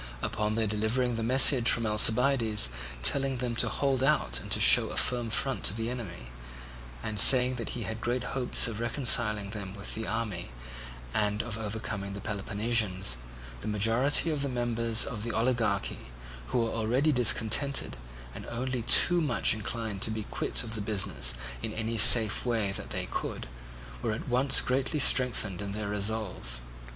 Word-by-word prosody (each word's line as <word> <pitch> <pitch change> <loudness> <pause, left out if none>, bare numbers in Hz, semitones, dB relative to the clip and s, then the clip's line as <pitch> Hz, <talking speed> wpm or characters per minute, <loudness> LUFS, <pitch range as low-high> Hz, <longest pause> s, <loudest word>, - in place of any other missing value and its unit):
Upon 105 0 -2
their 115 0 0
delivering 110 +4 -1
the 115 - -4
message 125 +1 +5
from 115 - +3
Alcibiades, 110 - +3 0.3
telling 135 - +2
them 120 -1 -3
to - - +3
hold 135 -2 -1
out 130 - +2
and - - -10
to - - +1
show - - +6
a - - -6
firm 120 -2 0
front 135 +4 -2
to 100 - +3
the 115 +1 -4
enemy, 85 - -8 0.7
and 105 -1 -4
saying 125 +2 +8
that 120 +1 -5
he 120 - -4
had 110 +1 -6
great 120 +1 -2
hopes 130 -2 -1
of 110 -2 -6
reconciling 115 -4 0
them 100 -2 -7
with 100 0 -7
the 110 0 -5
army 105 - -4 0.6
and 105 0 -1
of 115 -3 -6
overcoming 105 -2 -5
the 100 - -7
Peloponnesians, 100 - -2 0.4
the - - -7
majority 115 +10 +1
of 150 -2 -3
the 140 - -3
members 115 -2 -1
of 115 -6 -6
the 115 +1 -4
oligarchy, 115 - -2 0.4
who - - -3
were 115 - -3
already 120 +7 0
discontented 125 - +1 0.4
and - - -10
only 125 +1 -4
too 175 +9 +5
much 150 - +1
inclined 110 -1 -5
to - - +2
be 110 -1 -4
quit - - 0
of 115 -2 -5
the 110 - -5
business 95 - -2 0.3
in - - -4
any 110 +1 -3
safe 110 0 +5
way 115 -5 -1
that - - -8
they - - -3
could, - - -5 0.5
were 110 - -2
at 110 - -7
once 130 +2 +3
greatly 135 +4 -1
strengthened 120 -9 +1
in 100 -1 -6
their 105 -1 -5
resolve. 105 - -3
115 Hz, 170 wpm, -28 LUFS, 105-125 Hz, 0.7 s, saying